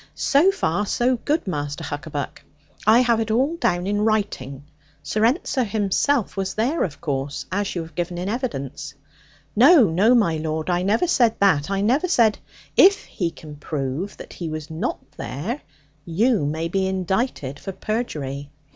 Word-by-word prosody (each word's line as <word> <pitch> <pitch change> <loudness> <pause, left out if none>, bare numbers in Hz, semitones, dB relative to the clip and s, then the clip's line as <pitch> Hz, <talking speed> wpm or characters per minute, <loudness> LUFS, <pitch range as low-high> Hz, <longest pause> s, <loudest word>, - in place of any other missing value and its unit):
So 305 +6 +4
far 205 - 0
so 245 +4 +1
good 300 +7 -1
Master 145 -6 -3
Huckaback. 145 -1 -5 0.4
I 225 +3 +7
have 235 -2 +2
it 225 -1 -2
all 265 +9 +2
down 175 - 0
in 205 +1 0
writing. 200 -11 -1 0.4
Sir 215 - -1
Ensor 260 +1 +2
himself 215 +4 0
was 195 -1 -3
there, 250 +10 +1
of 145 -6 -4
course, 140 -2 -3
as 200 +1 -1
you 170 - -2
have 165 0 -13
given 175 +2 -3
in 180 +2 -3
evidence 150 - -4 0.3
' 145 0 -31
'No, 275 +5 +7
no, 210 +9 +4
my 170 -9 +2
lord, 155 +2 -2
I 175 0 +1
never 210 - +2
said 240 -10 +3
that: 175 -7 +3
I 195 0 0
never 260 - +2
said 230 - +3 0.2
' - - -26
'If 395 +2 +6
he 175 -3 -2
can 155 -2 -11
prove 145 +5 -4
that - - -10
he 170 -2 -5
was 155 0 -6
not 170 +10 -2 0.2
there, 210 - -4 0.4
you 190 - +1
may 160 +3 -2
be 190 +2 0
indicted 190 - -2
for 195 - -6
perjury. 150 - -4
190 Hz, 175 wpm, -23 LUFS, 155-235 Hz, 0.4 s, I